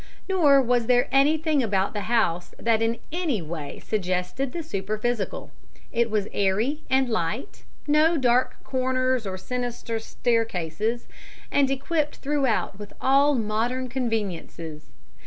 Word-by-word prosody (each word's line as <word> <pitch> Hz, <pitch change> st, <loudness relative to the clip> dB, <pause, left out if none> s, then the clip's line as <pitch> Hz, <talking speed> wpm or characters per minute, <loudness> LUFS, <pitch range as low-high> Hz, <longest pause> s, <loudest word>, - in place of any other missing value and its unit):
Nor 295 Hz, -8 st, +5 dB
was 240 Hz, -2 st, +1 dB
there 245 Hz, -1 st, +4 dB
anything 300 Hz, +2 st, +3 dB
about 195 Hz, -4 st, 0 dB
the 210 Hz, 0 st, -4 dB
house 180 Hz, -7 st, +1 dB
that 225 Hz, -1 st, +1 dB
in 225 Hz, +1 st, +1 dB
any 325 Hz, -, 0 dB
way 155 Hz, -3 st, -6 dB
suggested 185 Hz, +5 st, -2 dB
the 340 Hz, -1 st, -4 dB
superphysical. 215 Hz, -2 st, -3 dB, 0.4 s
It 235 Hz, 0 st, +1 dB
was 210 Hz, -2 st, 0 dB
airy 215 Hz, +10 st, +1 dB
and 265 Hz, 0 st, +3 dB
light 220 Hz, -, -3 dB, 0.2 s
no 310 Hz, +3 st, +4 dB
dark 250 Hz, -2 st, +2 dB
corners 255 Hz, -2 st, 0 dB
nor 190 Hz, -1 st, -4 dB
sinister 240 Hz, +1 st, -3 dB
staircases 225 Hz, -2 st, -1 dB, 0.5 s
and 280 Hz, -2 st, +3 dB
equipped 295 Hz, +3 st, -1 dB
throughout 270 Hz, -8 st, 0 dB
with 205 Hz, -1 st, -9 dB
all 280 Hz, +2 st, +4 dB
modern 235 Hz, +3 st, -1 dB
conveniences. 195 Hz, -, -4 dB
240 Hz, 125 wpm, -25 LUFS, 210-270 Hz, 0.5 s, Nor